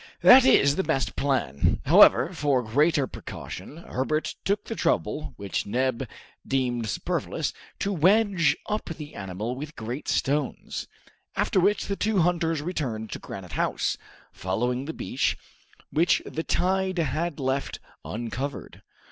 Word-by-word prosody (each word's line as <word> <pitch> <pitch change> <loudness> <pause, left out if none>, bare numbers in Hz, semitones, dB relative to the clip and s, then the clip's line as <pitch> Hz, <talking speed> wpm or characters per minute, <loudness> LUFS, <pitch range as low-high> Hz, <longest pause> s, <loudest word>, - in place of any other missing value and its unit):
"That 260 0 +9
is 140 - +5
the 190 - +1
best 135 -6 -1
plan." 130 - +1
However, - - +6
for 140 -4 +1
greater 145 +5 +2
precaution, 145 - -8
Herbert 155 -1 -2
took 205 +1 0
the - - -4
trouble, 155 -7 -1
which 100 -1 -3
Neb 125 +2 0 0.4
deemed 125 -4 -1
superfluous, - - -2 0.2
to 200 - -1
wedge 185 -2 +3
up 210 0 -2
the 155 -2 -7
animal 100 +5 -4
with 150 +3 -7
great 120 +6 -5
stones; 145 0 -1 0.5
after - - +2
which 200 +3 +2
the 200 - -2
two 215 +1 0
hunters 165 -3 +1
returned 125 -11 -3
to - - -5
Granite 90 -3 -8
House, - - 0 0.4
following 125 +8 -1
the 160 - -4
beach, - - -1 0.5
which 170 +3 +3
the 160 - -4
tide 190 +2 0
had 160 +1 -1
left 135 +1 -1 0.3
uncovered. 120 +5 -5
145 Hz, 135 wpm, -26 LUFS, 125-170 Hz, 0.5 s, That